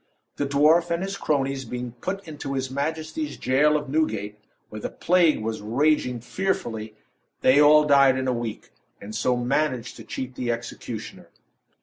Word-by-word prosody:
The 145 - -1
dwarf 155 +5 +4
and 170 +2 -1
his 195 +1 -3
cronies 135 -6 -1
being 125 0 -5
put 195 0 -4
into 145 -3 -5
his 130 -1 -2
majesty's 155 +2 -3
jail 150 +4 +3
of 145 -1 -5
Newgate, 110 -9 -1 0.3
where 110 0 -8
the - - -3
plague 170 -8 +2
was 110 -1 -3
raging 125 +2 +1
fearfully, 120 - -3 0.5
they 135 +3 +5
all 150 +1 +7
died 140 -2 +5
in 130 0 -2
a 130 - +2
week, 115 -2 -5 0.3
and 105 +2 -9
so 120 +3 +1
managed 125 0 -1
to - - -10
cheat 130 -1 -6
the 125 -1 -2
executioner. 115 0 -7
135 Hz, 160 wpm, -24 LUFS, 120-155 Hz, 0.5 s, all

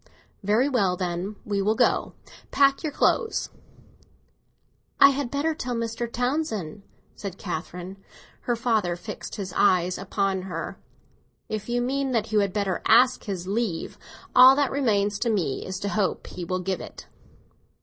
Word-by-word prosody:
"Very 215 +7 +2
well, 200 -10 +1
then, 180 +3 -3
we 205 -2 -1
will 215 +3 +2
go. - - +1 0.3
Pack 275 0 +4
up - - -15
your 310 - -2
clothes." 445 - +1 1.5
"I 280 - +9
had 275 -2 -2
better 290 +4 0
tell 250 -5 -4
Mr. 230 0 -3
Townsend," 240 - -2 0.3
said 200 -4 -7
Catherine. 180 +1 -6 0.5
Her 240 - +1
father 225 -7 0
fixed 175 - -7
his 190 -3 -5
cold - - 0
eyes 180 -2 +3
upon 195 0 -1
her. 175 -3 -6 0.7
"If 215 +1 -4
you 240 0 0
mean 270 +1 -1
that 225 -2 -1
you 215 - +3
had 200 -2 +1
better 200 -2 -1
ask 245 +3 +5
his 190 -4 -4
leave, 200 -3 -2 0.4
all 255 +1 +9
that 285 -2 +1
remains 210 -7 +1
to 240 - 0
me 185 -11 -1
is 185 0 -5
to 200 - -2
hope 205 -2 -1
he 175 - -7
will 185 +1 -2
give 190 +1 -2
it." - - -10
210 Hz, 160 wpm, -25 LUFS, 185-245 Hz, 1.5 s, I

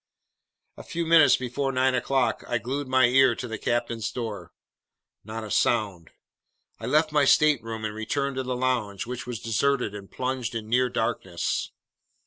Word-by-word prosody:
A - - -9
few 170 0 -3
minutes 160 -5 +6
before 130 +2 -2
nine 130 0 +2
o'clock, 135 0 0
I 120 - 0
glued 135 +4 -4
my 130 -1 +4
ear 130 0 +4
to 125 - -6
the 110 -2 -5
captain's 115 -2 -1
door. 105 -8 -6 0.7
Not 110 +2 -6
a 105 - -7
sound. 100 -8 0 0.7
I - - -5
left 155 +1 +2
my 150 -1 +3
stateroom 115 -7 +2
and 105 - -3
returned 135 +5 -2
to - - 0
the 125 0 -3
lounge, 120 -6 -1
which 125 0 -6
was 120 -3 -4
deserted 120 0 0
and 100 -1 -9
plunged 125 -2 -3
in 110 -1 -4
near 125 +2 +2
darkness. 95 -7 -2
125 Hz, 165 wpm, -26 LUFS, 110-130 Hz, 0.7 s, minutes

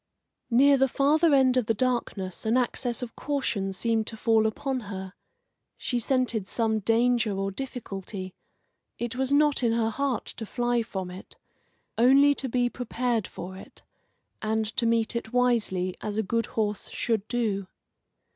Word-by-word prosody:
Near 275 +4 +5
the 270 0 +4
farther 300 +5 +3
end 260 -2 +4
of 245 -4 +1
the 225 - +2
darkness 220 -6 -2
an 225 +3 +2
access 245 0 -1
of 235 - -7
caution 235 -9 -2
seemed 220 +3 0
to 220 - -2
fall 220 -1 +3
upon 260 +4 -2
her. 190 -1 -6 0.6
She 245 - -1
scented 240 -5 0
some 220 -1 0
danger 230 0 +2
or 195 0 -1
difficulty; 195 -5 -6 0.6
it 240 0 -3
was 265 +1 -1
not 295 -1 +4
in 235 -2 +2
her 225 -1 +1
heart 275 -1 -1
to 225 - -5
fly 240 0 0
from 190 -5 -5
it 185 +2 -11 0.6
only 275 +4 +6
to 270 -2 -4
be 245 +1 +2
prepared 240 -3 -2
for 185 +2 -8
it, 190 - -13 0.6
and 220 0 0
to 235 -2 +2
meet 230 0 +1
it 235 0 -4
wisely, 220 -7 +1
as 210 0 -4
a 220 - +1
good 230 +3 -1
horse 210 -2 -2
should 220 -3 -1
do. 215 -5 -1
230 Hz, 160 wpm, -27 LUFS, 210-255 Hz, 0.6 s, only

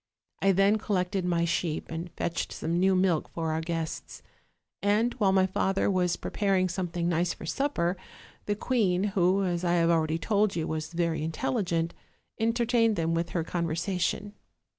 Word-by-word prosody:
I 195 - +4
then 195 +3 +3
collected 185 -3 -1
my 170 -1 +1
sheep, 160 -1 -2
and 165 +2 -4
fetched 170 0 -2
some 170 +2 -2
new 190 +1 +4
milk 185 -4 +1
for 165 -1 -3
our 160 +1 -1
guests; 165 -1 -4 0.6
and, 215 +4 +2
while 200 -3 +4
my 190 -1 +4
father 190 +1 +1
was 180 -2 +1
preparing 195 -3 0
something 175 -1 -2
nice 175 0 +1
for - - -9
supper, 190 -11 0 0.5
the 205 - +1
queen, 200 -6 +1
who, 190 +1 +3
as 175 -2 -1
I 175 -1 +2
have 170 -1 +3
already 160 -1 +1
told 205 +5 +1
you, 165 -2 -1
was 160 +1 -3
very 165 -2 0
intelligent, 170 -1 -1 0.5
entertained 230 0 +2
them 165 -2 0
with 170 0 -1
her 170 -1 -1
conversation. 175 +4 -2
180 Hz, 160 wpm, -28 LUFS, 165-195 Hz, 0.6 s, I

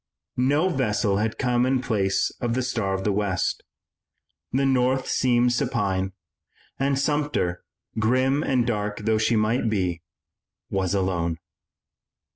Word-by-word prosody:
No 145 +7 +2
vessel 105 - 0
had 110 +2 -1
come 125 -2 +1
in 130 +1 +2
place 105 -6 0
of 120 -1 0
the 130 - 0
Star 110 -6 -1
of 95 - -4
the 105 - +1
West. 100 -3 -1 0.9
The 135 +2 +1
North 130 0 +2
seemed 120 -1 +2
supine, 100 -7 -1 0.7
and 135 0 +1
Sumter, 145 - 0 0.4
grim 130 +5 +2
and 130 -5 +1
dark 105 -3 -2
though 110 0 +1
she 115 +2 +2
might 110 +2 +1
be, 90 -5 -1 0.7
was 95 0 0
alone. 85 -4 0
115 Hz, 130 wpm, -24 LUFS, 100-130 Hz, 0.9 s, No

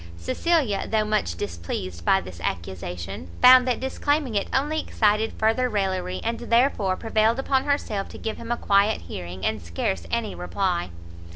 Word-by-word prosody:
Cecilia, 250 - 0
though 215 -1 +2
much 210 - 0
displeased 85 -1 -5
by - - +3
this 90 -1 -10
accusation, 90 0 -5
found 255 0 +8
that 250 - +1
disclaiming 275 0 -1
it 200 -1 0
only 295 +4 +1
excited 215 -4 +1
further 225 +3 +1
raillery, 185 -3 -1
and 230 +1 -2
therefore 235 -5 +2
prevailed 225 +2 +1
upon 270 0 +1
herself 220 -9 -1
to - - -10
give 220 -1 -4
him 230 - -7
a 240 - +1
quiet 200 +2 +2
hearing, 90 +2 -7
and 110 -1 -1
scarce 85 +1 -3
any - - -1
reply. 170 - -1
205 Hz, 160 wpm, -24 LUFS, -, -, found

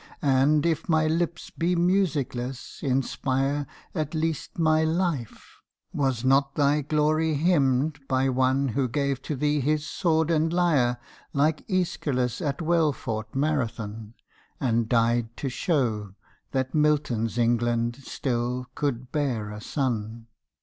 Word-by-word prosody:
And, 140 +2 +3
if 165 +1 0
my 160 -1 +3
lips 170 +2 -1
be 175 +2 0
musicless, 145 -9 -1
inspire 135 +1 0 0.3
At 155 -2 -3
least 160 -1 -2
my 155 -1 +3
life: 160 - -2 0.4
was 130 -4 0
not 135 +1 +3
thy 145 +1 +3
glory 155 +2 +1
hymned 145 -2 +2
By 130 0 +2
One 130 +1 +2
who 130 +2 0
gave 140 +1 -1
to 150 - -3
thee 150 +2 +1
his 150 +2 0
sword 160 -1 +1
and 160 0 +2
lyre 150 -9 +2 0.4
Like 150 +2 +1
Æschylos 150 - -1
at 145 +2 -2
well 165 -2 +3
fought 110 -3 -5
Marathon, 115 -7 -2 0.4
And 115 -2 +1
died 115 0 +1
to 135 - -2
show 120 - -1 0.3
that 130 -1 -2
Milton's 145 -7 +1
England 120 0 +1
still 125 -1 -2
could 130 -3 -2
bear 120 -8 -1
a 105 0 -7
son! 115 -4 -2
140 Hz, 130 wpm, -26 LUFS, 120-155 Hz, 0.4 s, And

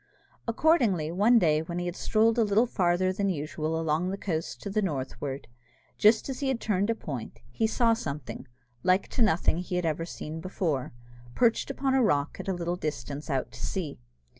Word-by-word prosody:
Accordingly, 230 - +2
one 210 +7 +5
day 155 -7 +3
when 170 +2 -5
he 175 - -2
had 175 0 -3
strolled 225 +2 +2
a - - +5
little 210 +3 +3
farther 185 -4 +1
than 200 +1 0
usual 155 -1 -2
along 165 +3 0
the 195 - -3
coast 165 -5 -3
to 200 - -4
the 215 +2 +1
northward, 140 -4 -3 0.5
just 215 +1 +5
as 265 -2 -4
he 275 -2 0
turned 205 -3 0
a 230 - +2
point, 135 - -6
he 220 - +1
saw 230 +1 +3
something, 140 - -5 0.3
like 185 +1 +2
to - - -2
nothing 175 -5 +3
he 180 0 -4
had 180 -1 0
ever 160 +1 -1
seen 160 -1 -6
before, 160 -7 -2 0.4
perched 230 -2 +2
upon 270 -1 0
a 265 - +4
rock 145 - +1
at - - -6
a 190 - +1
little 175 0 -2
distance 145 -2 -5
out 135 -3 -1
to - - -9
sea. 175 -7 -3
180 Hz, 190 wpm, -28 LUFS, 155-215 Hz, 0.5 s, one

